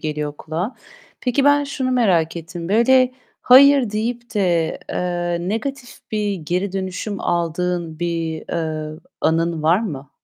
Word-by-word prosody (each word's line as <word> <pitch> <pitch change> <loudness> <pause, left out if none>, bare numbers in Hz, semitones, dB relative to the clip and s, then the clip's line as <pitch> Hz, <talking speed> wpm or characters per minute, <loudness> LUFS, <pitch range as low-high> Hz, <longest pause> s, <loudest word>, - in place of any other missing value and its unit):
geliyor 150 -1 -3
kulağa. 170 - -4 0.5
Peki, 255 +2 +1
ben 285 0 +4
şunu 260 -2 -2
merak 180 -10 +2
ettim: 170 +1 -7
Böyle, 255 +4 +4 0.3
hayır 270 -2 +7
deyip 235 +2 -3
de, 175 -5 +1
eee, 175 0 -2
negatif 245 +4 -4 0.2
bir 210 -2 0
geri 180 +3 -2
dönüşüm 195 +2 -4
aldığın 170 -1 -1
bir, 165 -2 -2
eee, 155 -2 -3 0.2
anın 165 0 +1
var 165 +5 +4
mı? 145 -10 -6
180 Hz, 130 wpm, -20 LUFS, 165-230 Hz, 0.5 s, hayır